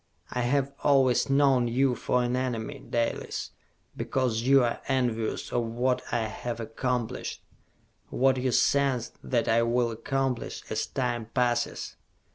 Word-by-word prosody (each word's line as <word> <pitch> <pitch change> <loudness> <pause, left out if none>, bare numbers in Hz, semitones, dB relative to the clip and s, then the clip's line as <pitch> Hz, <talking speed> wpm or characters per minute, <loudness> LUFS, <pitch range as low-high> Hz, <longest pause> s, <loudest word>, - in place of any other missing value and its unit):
I 125 - -1
have 140 +3 +1
always 135 -4 +4
known 135 -3 +4
you 130 +2 +2
for 125 0 0
an 120 +1 0
enemy, 125 -4 -2
Dalis, 115 -1 -2 0.4
because 125 -4 0
you 135 +2 +5
are 120 - -1
envious 120 -5 -1
of 120 -1 0
what 125 +3 0
I 120 - +1
have 115 +2 -4
accomplished, 115 +1 -3 0.7
what 130 0 +2
you 130 0 0
sense 135 -2 +2
that 120 -3 0
I 115 +1 +4
will 120 0 +1
accomplish 130 +2 -2
as - - -1
time 120 -3 -2
passes!" 120 0 -1
125 Hz, 135 wpm, -28 LUFS, 115-130 Hz, 0.7 s, you